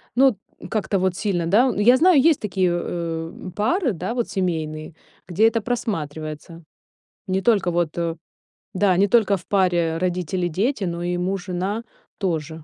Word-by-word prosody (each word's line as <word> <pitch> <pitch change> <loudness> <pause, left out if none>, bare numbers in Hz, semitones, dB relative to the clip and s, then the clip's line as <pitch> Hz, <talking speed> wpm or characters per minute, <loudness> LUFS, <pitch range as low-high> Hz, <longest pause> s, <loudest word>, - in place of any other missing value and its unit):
Ну 260 -3 +5 0.3
как-то 210 -2 -1
вот 185 -1 0
сильно, 180 -5 -1
да. 240 +8 +4
Я 240 +5 +5
знаю, 340 -1 +5
есть 315 -1 +4
такие, 190 -3 0
э, 165 -1 -3 0.2
пары, 265 - +1
да, 185 +6 -4
вот, 240 -2 -2
семейные, 160 -4 -3 0.3
где 195 +6 +3
это 225 0 0
просматривается. 165 -8 -4 0.6
Не 190 0 0
только 200 -6 +2
вот, 170 -1 -1
э 170 -1 -1 0.6
да, 185 -1 +2
не 200 +1 +4
только 205 -3 +3
в 180 - -15
паре 175 -4 +1
родители-дети, 180 - -1
но 170 0 -3
и 175 0 -1
муж-жена 190 +3 -2 0.3
тоже. 160 -4 -3
185 Hz, 145 wpm, -22 LUFS, 170-215 Hz, 0.6 s, Ну